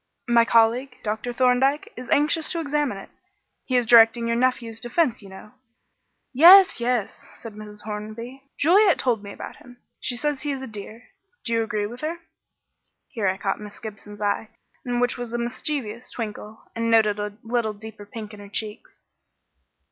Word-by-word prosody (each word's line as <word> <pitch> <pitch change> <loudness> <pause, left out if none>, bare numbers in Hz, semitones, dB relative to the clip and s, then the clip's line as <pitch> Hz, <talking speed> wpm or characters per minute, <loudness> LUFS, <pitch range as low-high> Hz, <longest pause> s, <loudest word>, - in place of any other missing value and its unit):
"My 235 -1 +5
colleague, 235 +4 +2
Dr. 215 +3 -3
Thorndyke, 255 +4 +2
is 250 0 -9
anxious 305 +2 +2
to 335 - -2
examine 295 -7 -1
it. 195 - -11 0.6
He 255 - 0
is 245 -1 +3
directing 230 +1 +6
your 230 0 0
nephew's 235 -2 0
defence, 245 0 0
you 200 - -13
know." 190 +2 -12 0.8
"Yes, 360 +7 +8
yes," 235 -3 -2
said 230 -2 -10
Mrs. 210 0 -10
Hornby. 220 +5 -7 0.2
"Juliet 375 +4 +5
told 235 -5 +1
me 200 -1 -9
about - - -9
him. 245 0 -16 0.2
She 245 - -2
says 290 +2 -1
he 290 -1 -2
is 265 -1 -6
a - - -4
dear. 220 +1 -9 0.4
Do 230 - 0
you 230 - +2
agree 215 -2 -2
with 240 +4 -8
her?" 320 +3 -3 0.9
Here 220 -6 -2
I 190 0 0
caught 195 0 -2
Miss 210 -1 -9
Gibson's 210 -1 -9
eye, 205 +2 -1 0.3
in 245 -1 -2
which 245 0 0
was 240 -1 -5
a - - 0
mischievous 240 -1 -3
twinkle, 215 -1 -7
and 230 0 -1
noted 215 -2 +3
a 205 0 -5
little 225 -1 -1
deeper 210 0 -11
pink 215 0 -8
in 210 - -11
her 200 -1 -11
cheeks. 215 +2 -6
230 Hz, 180 wpm, -24 LUFS, 215-255 Hz, 0.9 s, Yes